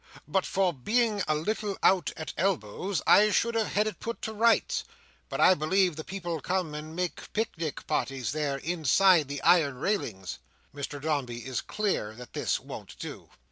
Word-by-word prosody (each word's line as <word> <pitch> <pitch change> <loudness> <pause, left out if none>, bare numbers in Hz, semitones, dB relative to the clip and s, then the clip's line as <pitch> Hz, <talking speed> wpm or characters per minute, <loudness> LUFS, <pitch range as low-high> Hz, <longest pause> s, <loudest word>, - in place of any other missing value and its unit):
But 185 +5 0
for 190 -2 +1
being 215 - +1
a 155 - +2
little 205 +5 -2
out 185 -2 +4
at 155 -4 -5
elbows, 180 - -1
I 210 +1 +7
should 235 +2 +2
have 225 -2 0
had 210 +1 +3
it 215 -5 -4
put 230 +1 -4
to 220 - -3
rights; 230 +2 +2 0.5
but - - -4
I 185 - +7
believe 180 +2 +2
the 155 - -6
people 175 -4 -4
come 180 -3 -1
and 155 +1 -7
make 180 0 -3
pic 220 +1 -1
nic 160 -3 -4
parties 135 -2 -1
there 145 -2 -1
inside 165 +2 +3
the 140 0 -5
iron 145 -7 +4
railings." 115 - -2 0.3
Mr 145 0 -5
Dombey 135 -6 -2
is 130 -4 -2
clear 195 - -2
that 125 0 -11
this - - 0
won't - - -9
do. - - -8
170 Hz, 180 wpm, -28 LUFS, 145-200 Hz, 0.5 s, I